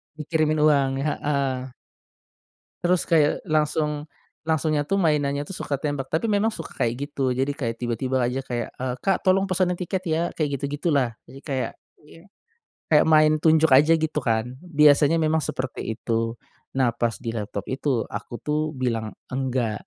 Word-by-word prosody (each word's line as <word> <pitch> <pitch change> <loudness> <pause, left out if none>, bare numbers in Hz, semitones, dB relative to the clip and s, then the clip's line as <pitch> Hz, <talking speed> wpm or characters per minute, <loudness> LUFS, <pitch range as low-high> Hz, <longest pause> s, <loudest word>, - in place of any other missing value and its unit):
Dikirimin 155 0 0
uang, 140 -3 +4
heeh. 135 -4 -1 1.1
Terus 180 0 +3
kayak, 155 -3 +3
langsung 150 -1 0 0.4
langsungnya 155 -2 +1
tuh 195 - +1
mainannya 145 -3 +1
tuh 170 - -10
suka 140 - -1
tembak, 145 -3 -2
tapi 170 +8 -1
memang 205 +2 +2
suka - - -8
kayak 115 0 +1 0.2
gitu, 130 -3 -1
jadi 135 +2 0
kayak 120 -6 -3
tiba-tiba 125 +2 0
aja 125 +2 -1
kayak, 120 -3 -4
eee, 125 -1 -2
"Kak, 195 -2 +2
tolong 190 +1 +3
pesenin 185 -1 +1
tiket 180 +1 -3
ya." 160 +1 +1
kayak 145 -3 -1
gitu-gitulah. 140 -2 0 0.2
Jadi 135 - -12
kayak, 135 -4 -2 0.3
iya 165 +3 -17 0.7
kayak 150 0 +5
main 155 -1 +5
tunjuk 160 -1 +4
aja 150 +5 +6
gitu 160 -1 -1
kan, 120 +2 -1
biasanya 150 -2 +4
memang 160 +1 +2
seperti 130 -5 -3
itu. 115 0 -2 0.4
Nah 130 -3 +3
pas 115 0 -1
di 115 - -2
laptop 105 -3 -4
itu, 130 -3 0
aku - - -6
tuh 150 0 -1
bilang 115 -4 -2 0.2
"Enggak." 125 -4 -2
145 Hz, 155 wpm, -24 LUFS, 130-155 Hz, 1.1 s, aja